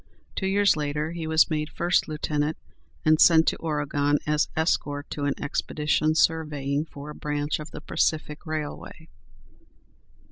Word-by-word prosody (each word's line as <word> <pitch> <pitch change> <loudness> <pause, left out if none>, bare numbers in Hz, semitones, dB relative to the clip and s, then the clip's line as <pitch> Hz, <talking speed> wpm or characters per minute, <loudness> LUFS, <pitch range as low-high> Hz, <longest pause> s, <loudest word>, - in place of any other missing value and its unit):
Two 190 - -1
years 200 -1 +4
later 150 +1 -2
he 165 -2 -5
was 160 +1 +4
made 150 0 -1
first 175 +1 +1
lieutenant, 150 0 -1 0.5
and 155 0 +4
sent 165 -1 +6
to - - -3
Oregon 145 -2 0
as 150 0 +1
escort 145 -3 0
to 145 - -3
an 140 - 0
expedition 150 +2 0
surveying 150 -3 +1
for 145 -1 -9
a - - -10
branch 150 0 -2
of 150 0 -7
the - - -9
Pacific 150 -1 -1
Railway. 155 +1 -6
150 Hz, 145 wpm, -26 LUFS, 145-160 Hz, 0.5 s, sent